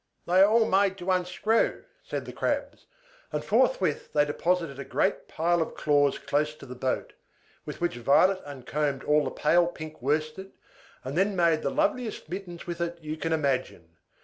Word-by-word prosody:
"They 180 Hz, +2 st, +3 dB
are 200 Hz, -, +7 dB
all 225 Hz, +1 st, +4 dB
made 195 Hz, 0 st, +2 dB
to 185 Hz, 0 st, -2 dB
unscrew," 185 Hz, +5 st, +1 dB, 0.2 s
said -, -, -5 dB
the -, -, -8 dB
Crabs; -, -, -3 dB, 0.4 s
and -, -, -3 dB
forthwith -, -, +1 dB
they 145 Hz, -1 st, +4 dB
deposited 165 Hz, -1 st, -1 dB
a -, -, -4 dB
great 190 Hz, +7 st, -1 dB
pile 170 Hz, +1 st, +1 dB
of 160 Hz, -, -3 dB
claws 145 Hz, -2 st, +2 dB
close 145 Hz, +2 st, -1 dB
to -, -, -12 dB
the 125 Hz, -, -8 dB
boat, 130 Hz, +1 st, -2 dB, 0.5 s
with -, -, -6 dB
which 175 Hz, -8 st, -1 dB
Violet 185 Hz, +10 st, +4 dB
uncombed 140 Hz, 0 st, -3 dB
all 150 Hz, 0 st, +3 dB
the -, -, -2 dB
pale 170 Hz, +3 st, +3 dB
pink 155 Hz, -4 st, -8 dB
worsted, 155 Hz, +7 st, -2 dB, 0.5 s
and 130 Hz, +2 st, -5 dB
then 195 Hz, +3 st, +2 dB
made 170 Hz, -3 st, +3 dB
the -, -, 0 dB
loveliest 265 Hz, -, -1 dB
mittens 175 Hz, -1 st, -7 dB
with 170 Hz, -1 st, -5 dB
it 170 Hz, 0 st, -2 dB
you 155 Hz, -1 st, -5 dB
can 165 Hz, +1 st, -3 dB
imagine. 130 Hz, -, -2 dB
165 Hz, 175 wpm, -27 LUFS, 145-185 Hz, 0.5 s, are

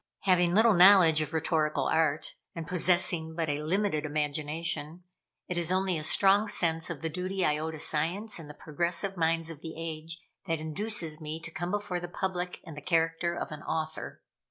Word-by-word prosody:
Having 180 Hz, -2 st, +3 dB
little 220 Hz, +1 st, +6 dB
knowledge 180 Hz, -4 st, +7 dB
of 155 Hz, -1 st, -3 dB
rhetorical 160 Hz, -1 st, 0 dB
art, 160 Hz, -2 st, +1 dB, 0.2 s
and 165 Hz, -1 st, -5 dB
possessing 175 Hz, -2 st, +1 dB
but 165 Hz, -2 st, -1 dB
a 145 Hz, +1 st, -1 dB
limited 170 Hz, -1 st, 0 dB
imagination, 155 Hz, +2 st, -3 dB, 0.4 s
it 180 Hz, -1 st, -2 dB
is 170 Hz, 0 st, 0 dB
only 185 Hz, -1 st, +1 dB
a 155 Hz, -, -2 dB
strong 195 Hz, +6 st, +4 dB
sense 165 Hz, -5 st, 0 dB
of 160 Hz, -5 st, -5 dB
the -, -, 0 dB
duty 185 Hz, +3 st, -2 dB
I 150 Hz, 0 st, +1 dB
owe 160 Hz, +1 st, -3 dB
to 160 Hz, -, -6 dB
Science 170 Hz, +8 st, -1 dB
and 155 Hz, -3 st, -10 dB
the 150 Hz, -, -10 dB
progressive 175 Hz, +5 st, -2 dB
minds 165 Hz, -1 st, 0 dB
of 155 Hz, -2 st, -11 dB
the 160 Hz, -1 st, -7 dB
age, 165 Hz, 0 st, -5 dB, 0.3 s
that 165 Hz, -1 st, 0 dB
induces 165 Hz, 0 st, -2 dB
me 155 Hz, +1 st, -5 dB
to 165 Hz, -, -7 dB
come 175 Hz, +2 st, -4 dB
before 205 Hz, -2 st, -2 dB
the 175 Hz, -, -6 dB
public 180 Hz, 0 st, -3 dB
in 165 Hz, -, -10 dB
the 150 Hz, -, -9 dB
character 165 Hz, +2 st, 0 dB
of -, -, -5 dB
an 150 Hz, 0 st, -7 dB
author. 160 Hz, 0 st, -4 dB
165 Hz, 190 wpm, -29 LUFS, 155-180 Hz, 0.4 s, knowledge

